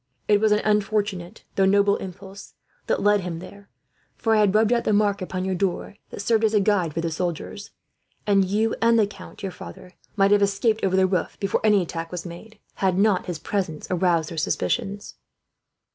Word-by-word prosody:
It 205 -1 +3
was 220 -1 +3
an 210 - +2
unfortunate, 205 -4 -1
though 195 - +2
noble 200 +1 +3
impulse, 195 +1 -10 0.3
that - - 0
led 205 0 +4
him 175 -2 -5
there; 200 +4 -12 0.5
for 225 - 0
I 215 - +4
had 205 -1 +3
rubbed 220 +2 +4
out 235 - +1
the 215 - +1
mark 205 -1 +2
upon 185 0 -3
your 190 - -1
door 185 +1 -2
that - - -7
served 225 +1 +2
as 220 0 +2
a - - +5
guide 190 -6 +1
for 165 - -1
the 165 0 -2
soldiers, 175 +4 -4 0.6
and 200 -2 +3
you 210 +4 0
and 230 0 +4
the 215 - +4
count 205 - -12 0.7
might 200 -1 +3
have 205 0 +5
escaped 200 +3 +1
over 190 -1 +1
the 190 0 +4
roof, 185 -2 -1
before 195 - -1
any 210 -3 +4
attack 165 -1 -6
was 180 -1 -5
made, 195 +6 -10 0.2
had 190 -2 +1
not 200 -2 +2
his 175 -3 -3
presence 160 -2 -3
aroused 175 -3 +1
their 165 - -3
suspicions." 195 - -2
200 Hz, 195 wpm, -24 LUFS, 180-210 Hz, 0.7 s, a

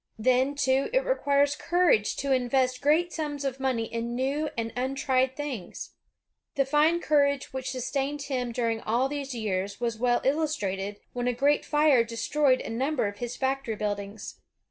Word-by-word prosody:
Then, 255 +5 +2
too, 265 0 +1
it - - +2
requires 285 - +2
courage 340 - +2
to 275 0 -2
invest 255 0 +1
great 320 +4 +2
sums 290 -3 -3
of 270 -1 -2
money 255 -4 0
in 230 +1 -4
new 280 +4 -1
and 230 -1 -3
untried 260 0 0
things. 270 -10 -6 0.6
The 275 - +2
fine 300 +5 +3
courage 280 -3 +1
which 260 -1 -4
sustained 275 +3 -2
him 250 -4 -2
during 230 -2 -1
all 240 +4 +1
these 280 -2 -5
years 200 -3 -2
was 235 -2 -2
well 245 0 +2
illustrated 210 -10 -1
when 245 0 -2
a 250 - +2
great 285 +4 +2
fire 295 -5 +4
destroyed 255 +4 +1
a - - -6
number 265 +3 0
of 205 0 -7
his 240 0 -4
factory 265 -4 -1
buildings. 205 0 -5
260 Hz, 165 wpm, -27 LUFS, 235-285 Hz, 0.6 s, fire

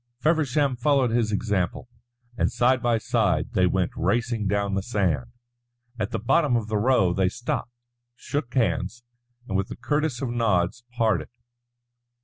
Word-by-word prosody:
Feversham 145 -3 +2
followed 130 -1 +2
his 115 -2 +1
example, 100 -1 -1 0.5
and - - +1
side 130 +1 +2
by 120 -1 +2
side 110 - 0
they 90 -1 +3
went 90 0 0
racing 115 +3 0
down 100 0 0
the 95 - 0
sand. 100 -1 0 0.7
At 105 -1 -1
the 115 - -2
bottom 125 +5 +2
of 110 -2 -1
the 110 - 0
Row 105 -6 +3
they 95 0 +2
stopped, 120 +2 -3 0.5
shook 140 -3 -4
hands, 120 -1 0 0.4
and 95 - -3
with 95 +1 +1
the - - -7
curtest 145 +1 -1
of 125 - -2
nods 115 -2 0
parted. 110 -7 +1
115 Hz, 150 wpm, -25 LUFS, 100-125 Hz, 0.7 s, they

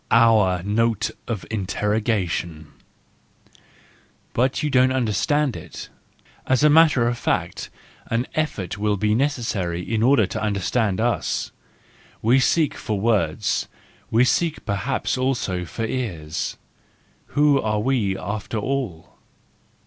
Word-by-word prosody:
Our 110 -6 +4
Note 110 +2 +1 0.2
of 115 -5 -4
Interrogation 100 -6 -2 1.6
.—But 130 +4 +1
you 150 - 0
don't 130 0 +4
under¬ 125 -5 0
stand 145 - +1
it? - - -9 0.6
As 130 +2 +2
a 150 - +6
matter 150 -6 +5
of 120 0 -2
fact, - - -2 0.4
an 115 +2 0
effort 105 - -2
will 105 -1 +1
be 105 +2 0
WE 110 - +1
FEARLESS 145 +1 +1
ONES 120 -2 -3
283 85 -3 -2
necessary 115 - -3
in - - 0
order 125 -2 +4
to 95 - -5
understand 105 0 0
us. 120 +1 -1 0.7
We 120 +4 +5
seek 150 +3 +2
for 105 -2 -3
words; 100 -3 0 0.4
we 115 +3 +4
seek 165 +4 0
perhaps 115 +6 -1
also 120 -9 -1
for 115 +6 -4
ears. 85 -11 -3 0.8
Who 145 -2 +4
are 105 -1 0
we 105 -5 0
after 105 +4 -4
all 115 -8 -4
110 Hz, 135 wpm, -23 LUFS, 100-130 Hz, 1.6 s, a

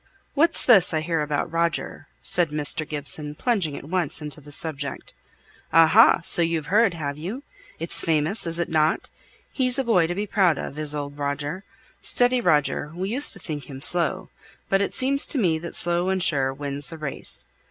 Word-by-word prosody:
"What's 330 +4 +4
this 195 -9 +4
I 155 - -1
hear 165 -1 -2
about 150 +1 -3
Roger?" 170 0 -3 0.2
said 175 -3 +3
Mr. 150 +1 -1
Gibson, 150 0 -3
plunging 185 - -2
at - - -10
once 175 -3 -2
into 150 0 -6
the 145 +1 -14
subject. 145 -2 -2 0.6
"Aha! 165 0 +5
so 175 - +4
you've 165 -2 -1
heard, 215 -4 +3
have 145 -2 -6
you? 210 - -7 0.3
It's 165 +1 0
famous, 160 +4 -1
isn't 165 -1 -2
it? 155 0 0 0.4
He's 255 -1 +1
a 270 - 0
boy 185 -9 +1
to 175 - -4
be 205 +2 -3
proud 190 -7 +1
of, 145 - -7
is 150 -1 +2
old 145 0 -7
Roger. 145 +6 -5 0.4
Steady 245 0 +2
Roger; 150 -4 0
we 185 +2 -4
used 275 +5 +6
to - - -4
think 150 -5 -8
him 135 -1 -9
slow, 175 +5 +4 0.4
but 195 0 +1
it 200 - -3
seems 275 +2 +1
to - - -1
me 170 -9 0
that 170 +1 -6
slow 175 +1 +3
and 190 -1 -1
sure 135 -6 0
wins 140 +1 -2
the 165 - -7
race. 150 -3 -3
165 Hz, 185 wpm, -22 LUFS, 150-190 Hz, 0.6 s, used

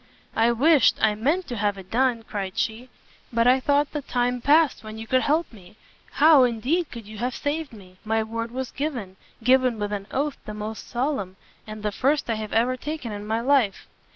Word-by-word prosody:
"I 225 +2 +4
wished, 280 +3 +4
I 220 -1 +3
meant 295 - 0
to 240 - -4
have 205 -1 0
done 245 -1 +2
it," 225 - -24
cried 195 -3 -5
she, 235 +3 -2 0.4
"but 230 0 +2
I 255 +2 +5
thought 285 +2 +1
the 295 - -3
time 245 -2 -1
past 300 +1 +3
when 215 0 -8
you 225 - -7
could 255 +3 +2
help 310 +1 0
me: 190 -2 -15 0.4
how, 300 -2 +6
indeed, 255 +8 0
could 230 -3 -8
you 215 0 -10
have 245 +1 -2
saved 295 0 -3
me? 185 -5 -15
my 220 0 0
word 230 +1 -4
was 255 +1 -5
given, 250 -11 -4 0.3
given 255 -1 +4
with 205 0 -3
an 200 -1 -4
oath 285 +1 -2
the 210 - -6
most 215 +1 -6
solemn, 240 -7 -2 0.3
and 215 0 -8
the 210 - 0
first 275 +3 0
I - - 0
have 215 - -6
ever 245 +3 +2
taken 295 -4 -5
in 205 0 -6
my 225 +1 0
life." 255 -6 +2
235 Hz, 210 wpm, -24 LUFS, 215-275 Hz, 0.4 s, how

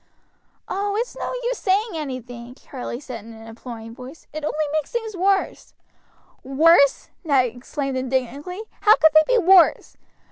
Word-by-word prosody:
"Oh! 405 +1 -2
it's 480 +3 -3
no - - -4
use - - -2
saying 415 +4 +1
anything," 250 -5 -7
Charlie 250 -3 -7
said 250 -6 -8
in 230 +1 -12
an 225 0 -13
imploring 225 0 -10
voice, 255 +5 -12
"it 310 0 -6
only 305 +1 -1
makes 310 -2 -2
things 445 -3 -4
worse." 385 +2 -1 0.7
"Worse!" 280 +2 +4
Ned 275 -6 +3
exclaimed 270 +2 -4
indignantly; 265 - -3 0.2
"how 430 +1 +6
could 315 - +4
they 310 +11 +5
be 440 - 0
worse? 370 -2 +4
295 Hz, 150 wpm, -22 LUFS, 250-375 Hz, 0.7 s, how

